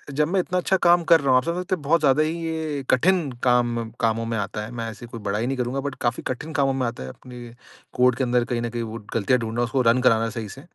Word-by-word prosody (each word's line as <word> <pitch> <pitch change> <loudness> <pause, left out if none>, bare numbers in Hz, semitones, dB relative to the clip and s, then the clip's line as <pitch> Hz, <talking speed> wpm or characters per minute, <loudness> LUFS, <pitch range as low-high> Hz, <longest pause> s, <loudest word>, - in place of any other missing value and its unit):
जब 150 +1 +2
मैं 190 0 +1
इतना 180 +1 -3
अच्छा 190 +2 +1
काम 175 0 +5
कर 165 -1 +6
रहा 140 - -1
हूँ 130 - +6
आप 130 - +2
समझ 170 +2 -2
सकते 180 - -1
बहुत 160 0 +1
ज़्यादा 145 +1 +4
ही 160 +2 -2
ये 160 -4 -3
कठिन 170 +3 +3
काम 120 -2 +1
कामों 115 0 0
में 115 0 -2
आता 105 +1 -3
है। 115 - -10
मैं 115 -1 -4
ऐसे 120 - -11
कोई 115 - -8
बढ़ाई 105 +3 -2
नहीं 135 0 -2
करूँगा 125 +2 -2
बट 140 -1 -4
काफ़ी 120 0 -1
कठिन 150 +5 -5
कामों 135 -2 +2
में 130 -2 -1
आता 115 - -6
है 65 - -7
अपने 120 - -11 0.4
कोड 125 -1 +3
के 130 - 0
अंदर 120 -1 +1
कहीं 120 -1 0
न 120 - -2
कहीं 120 0 -4
वो 115 +1 -6
गलतियाँ 115 +3 +2
ढूँढ़ना, 115 +1 -3
उसको 125 +2 0
रन 115 +1 +4
कराना 115 -2 +3
सही 110 -2 -6
से। 135 - -10
125 Hz, 275 wpm, -23 LUFS, 115-145 Hz, 0.4 s, कर